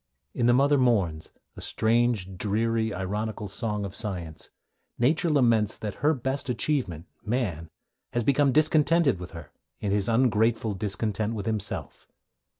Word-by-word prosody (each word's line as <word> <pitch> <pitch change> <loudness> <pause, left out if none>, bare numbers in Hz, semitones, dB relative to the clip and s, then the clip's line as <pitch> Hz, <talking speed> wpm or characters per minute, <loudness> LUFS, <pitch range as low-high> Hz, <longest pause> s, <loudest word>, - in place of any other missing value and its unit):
In 120 - +1
The 120 - +5
Mother 140 +2 +4
Mourns, 100 -11 +1 0.2
a - - -9
strange, 110 -4 +1
dreary, 110 +3 0
ironical 105 +3 -3
song 105 +1 -3
of 100 - -6
science, 85 -7 -5 0.5
Nature 155 +7 +2
laments 115 -8 +3
that 105 -2 -4
her 155 +2 +3
best 130 +1 -3
achievement, 120 - -1 0.2
man, 105 - -2 0.4
has 120 - 0
become 140 +2 +3
discontented 155 - +3
with 90 0 -7
her 80 -3 -10 0.3
in 100 - -2
his 100 +1 +1
ungrateful 115 -2 +2
discontent 105 +2 -2
with 100 -3 -4
himself. 110 -3 -4
110 Hz, 140 wpm, -27 LUFS, 100-125 Hz, 0.5 s, The